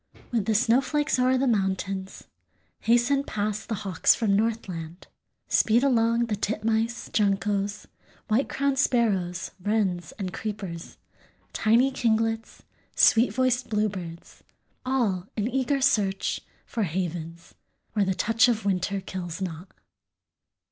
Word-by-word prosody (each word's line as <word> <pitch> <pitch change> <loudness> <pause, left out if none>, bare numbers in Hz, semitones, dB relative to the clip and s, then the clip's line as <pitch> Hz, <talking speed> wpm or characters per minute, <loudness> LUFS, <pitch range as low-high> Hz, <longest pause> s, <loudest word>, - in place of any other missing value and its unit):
_) - - -20
With 230 -5 0
the 220 - +2
snowflakes 260 +6 +2
o'er 255 +1 +3
the 265 - +1
mountains 195 -3 -1 0.6
Hasten 240 +4 +2
past 210 -2 -3
the 225 - 0
hawks 185 -3 +3
from 210 -4 +1
Northland, 190 -6 -3 0.4
Speed 230 +3 +3
along 235 -3 +3
the 220 -2 -2
titmice, 220 +3 -1
juncos, 200 0 0 0.4
White 235 +5 +1
crowned 275 -1 0
Sparrows, 195 -10 +1
wrens, 190 -5 0
and 190 -3 -5
creepers, 195 -6 -6 0.6
Tiny 235 +5 +3
kinglets, 225 -2 -1 0.3
sweet 230 +3 +5
voiced 255 -1 0
bluebirds, 190 -6 -4 0.4
All 210 -9 0
in 210 +1 0
eager 270 +2 0
search 205 -8 +1 0.2
for 230 - -4
havens 170 -2 -4 0.4
Where 210 -2 +2
the 190 -1 0
touch 225 +4 +3
of 225 -3 0
winter 195 0 0
kills 180 -3 -6
not. 180 -1 -5
215 Hz, 120 wpm, -26 LUFS, 190-235 Hz, 0.6 s, sweet